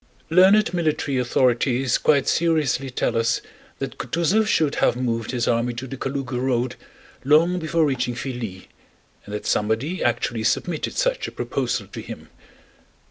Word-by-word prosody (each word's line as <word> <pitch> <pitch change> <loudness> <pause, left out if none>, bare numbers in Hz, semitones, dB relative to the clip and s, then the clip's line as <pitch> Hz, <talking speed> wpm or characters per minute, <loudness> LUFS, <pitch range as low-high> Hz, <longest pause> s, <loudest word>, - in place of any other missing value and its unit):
Learned 190 +4 +5
military 155 -5 0
authorities 125 +1 +1
quite 140 -3 +3
seriously 155 -5 +1
tell 125 - -1
us 115 0 +1 0.4
that - - -6
Kutúzov 185 +6 +1
should 155 -8 +2
have - - +3
moved 115 -3 -2
his 120 -2 -1
army 120 +1 +1
to 120 +3 -5
the 135 - -6
Kalúga 135 -2 -3
road 125 -1 0 0.5
long 165 +6 +4
before 160 0 +1
reaching 125 -3 -1
Filí, 115 -8 -5 0.6
and 105 - -6
that 105 - -6
somebody 115 - 0
actually 120 -1 0
submitted 155 +8 -1
such - - 0
a - - -7
proposal - - -2
to - - -8
him. - - -10
130 Hz, 145 wpm, -23 LUFS, 120-160 Hz, 0.6 s, Learned